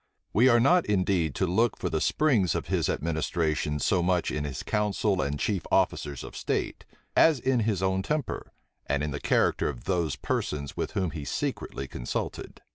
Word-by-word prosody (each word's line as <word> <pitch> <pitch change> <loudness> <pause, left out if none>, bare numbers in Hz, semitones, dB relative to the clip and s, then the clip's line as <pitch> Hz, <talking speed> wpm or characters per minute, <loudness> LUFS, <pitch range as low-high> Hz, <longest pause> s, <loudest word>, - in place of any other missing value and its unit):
We 125 +5 +5
are 120 -1 +5
not 175 +9 +4
indeed 90 -6 +1
to 95 - +1
look 110 +6 +1
for - - -2
the - - -1
springs 125 - +2
of - - -3
his - - +1
administration 80 -1 -1
so 90 +4 +1
much 90 0 +1
in 75 -1 -2
his 65 -3 -5
council 105 -2 0
and 70 +1 -2
chief 100 -5 0
officers 70 -3 +1
of - - -9
state, - - -2 0.3
as 160 -5 +5
in 130 0 +1
his 105 -4 0
own 95 0 +1
temper, 150 +4 -3 0.4
and 70 +1 0
in 75 - -2
the 75 - -4
character - - +2
of 60 -5 -7
those 85 -4 0
persons 70 -2 -3
with - - -3
whom 95 -4 0
he 75 -3 -6
secretly 70 -1 -3
consulted. - - -5
90 Hz, 185 wpm, -27 LUFS, 75-105 Hz, 0.4 s, We